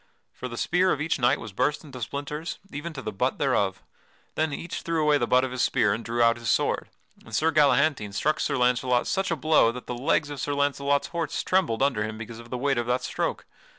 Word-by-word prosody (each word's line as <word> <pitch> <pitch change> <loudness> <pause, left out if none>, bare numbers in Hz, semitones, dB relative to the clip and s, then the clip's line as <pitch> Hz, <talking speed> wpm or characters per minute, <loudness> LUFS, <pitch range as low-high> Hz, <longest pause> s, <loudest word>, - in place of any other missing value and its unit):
For 125 - -6
the 120 -1 -7
spear 180 +6 +2
of - - 0
each 155 0 -1
knight 120 -1 +3
was 110 -3 -8
burst 145 +9 0
into 130 -5 -10
splinters, 145 +7 -4
even 150 +4 -5
to 135 -3 -7
the 110 - -3
butt 125 +6 -1
thereof. 105 -9 0 0.5
Then 155 -1 0
each 165 +4 -5
threw 165 -1 -1
away 150 -1 +3
the - - 0
butt 125 +1 +4
of 130 - -2
his 130 0 -2
spear - - +2
and 115 - -4
drew 120 +1 0
out 115 0 +4
his 115 -1 -4
sword, - - +1 0.3
and 115 - -7
Sir 160 +7 +2
Galahantine 140 -6 +3
struck 150 +9 0
Sir - - 0
Launcelot 125 0 +2
such 195 0 0
a 170 - +1
blow 155 -6 +4
that 125 +1 -8
the - - -4
legs 145 +4 0
of 140 -3 -5
Sir 145 +1 -1
Launcelot's 140 0 +1
horse 165 -3 -2
trembled 170 -11 +1
under 130 -7 +1
him 110 0 -5
because 115 +1 -8
of 115 0 -12
the 125 - -3
weight 135 0 +1
of 120 - -2
that 125 +1 0
stroke. - - -2
135 Hz, 240 wpm, -26 LUFS, 120-150 Hz, 0.5 s, butt